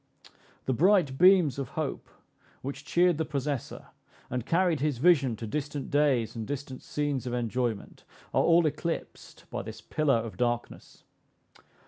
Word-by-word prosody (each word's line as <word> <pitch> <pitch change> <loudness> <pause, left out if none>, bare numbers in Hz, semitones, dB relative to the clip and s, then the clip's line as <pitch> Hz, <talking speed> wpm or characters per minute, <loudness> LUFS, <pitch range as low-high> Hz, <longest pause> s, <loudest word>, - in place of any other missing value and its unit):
The 130 - +1
bright 165 - +3
beams 180 -7 +5
of 135 -3 -4
hope, 155 -4 -3 0.5
which 140 +2 -5
cheered 175 -2 +3
the - - +2
possessor, 140 -3 -4 0.4
and 125 -2 -3
carried 170 -2 +2
his 145 -2 0
vision 135 -5 +4
to 115 - -7
distant 145 +3 -4
days 140 -7 +2
and 110 -2 -5
distant 140 -2 -5
scenes 145 -4 -2
of 120 - -2
enjoyment, 120 -2 -3 0.3
are - - +4
all 170 0 +4
eclipsed 155 +3 -4
by - - -3
this 110 +2 -8
pillar 140 +3 +1
of 115 -1 -5
darkness. 120 -1 -3
140 Hz, 145 wpm, -28 LUFS, 120-155 Hz, 0.5 s, beams